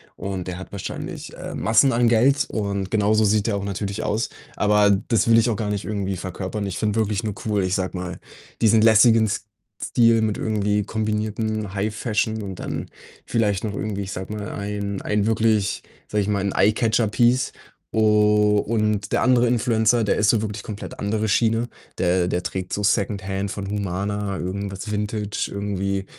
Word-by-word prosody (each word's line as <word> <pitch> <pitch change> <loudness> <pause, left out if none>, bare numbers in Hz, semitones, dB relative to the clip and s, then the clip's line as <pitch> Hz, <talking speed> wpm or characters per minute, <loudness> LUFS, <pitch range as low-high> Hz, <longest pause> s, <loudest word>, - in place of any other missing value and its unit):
und 95 -2 -5
der 90 -1 -4
hat 95 - -9
wahrscheinlich, 100 -2 -6
äh, - - -6
Massen 115 +6 +4
an 120 0 +3
Geld 125 +5 +4
und 100 -3 -2
genauso 110 0 +3
sieht 105 +1 +2
er 100 - 0
auch 100 - -4
natürlich 100 +2 -3
aus. 110 +3 -1 0.3
Aber 105 0 +4 0.2
das 115 -1 +2
will 115 - +7
ich 115 +1 +4
auch 110 - -1
gar 105 -2 -2
nicht 105 -1 -2
irgendwie 100 -2 -2
verkörpern. 95 +4 -4
Ich 95 - -4
finde 110 0 0
wirklich 105 0 -1
nur 105 - -2
cool, 105 -3 +1
ich 95 0 0
sage 95 0 -2
mal, 90 0 -5 0.4
diesen 110 0 +5
lässigen 110 0 +6
S 100 -1 -3 0.4
Stil 115 -2 +4
mit 110 -2 0
irgendwie 105 -1 0
kombinierten 110 -1 -2
High 105 +2 -1
Fashion 110 -1 -1
und 95 -2 -6
dann - - -4 0.4
vielleicht 105 -3 0
noch 105 - -3
irgendwie, 100 -2 -3
ich 95 - -6
sage 95 +3 -6
mal, 105 -1 -5
ein 100 -1 -4
ein 105 -1 0
wirklich, 110 -2 +1 0.2
sage 105 - 0
ich 100 - -2
mal 100 -1 +1
'n 100 - -1
Eye-Catcher-Piece. 115 +3 +2 0.4
U 105 -1 +4
und 105 -2 -1
der - - +2
andere 125 -1 +4
Influencer, 115 -1 +2
der 105 - +1
ist 105 0 +3
so 110 -2 +3
wirklich 105 -1 -4
komplett 105 -2 -7
andere 110 +1 -1
Schiene. 115 +3 +2 0.3
Der 90 0 +2
der 90 0 -1
trägt 90 +1 -4
so 105 - -2
Secondhand 100 -1 0
von 100 -1 -5
Humana, 100 0 -2
irgendwas 100 +2 -4
Vintage, 105 0 -2
irgendwie 100 -1 -2
105 Hz, 180 wpm, -23 LUFS, 100-110 Hz, 0.4 s, will